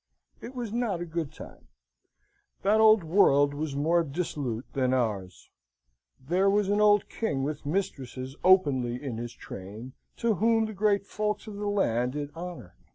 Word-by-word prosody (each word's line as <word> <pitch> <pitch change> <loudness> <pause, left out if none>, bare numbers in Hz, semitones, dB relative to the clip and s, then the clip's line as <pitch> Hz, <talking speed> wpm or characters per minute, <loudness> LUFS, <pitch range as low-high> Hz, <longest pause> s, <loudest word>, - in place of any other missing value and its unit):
It 250 +3 -9
was 235 -4 -4
not 230 -7 -1
a 175 - -4
good 165 -3 -4
time. - - -13 1.0
That 215 +2 +4
old 215 -3 +6
world 145 -5 +4
was 145 -1 -4
more 165 +4 +2
dissolute 140 -6 -3
than 130 -1 +1
ours. 100 -7 -3 0.7
There 180 +9 +1
was 205 0 +2
an 205 +1 +2
old 210 -1 +4
king 145 -12 -2
with 145 0 -4
mistresses 135 -6 -3
openly 140 -10 +4
in 125 -3 -5
his 120 0 -5
train, 105 +7 -9 0.2
to 230 -1 +1
whom 225 +3 +2
the 220 - -6
great 200 -1 +1
folks 210 0 -2
of 210 -2 -8
the 205 0 -3
land 125 - +1
did 145 0 -4
honour. 170 - -8
165 Hz, 160 wpm, -28 LUFS, 130-205 Hz, 1.0 s, old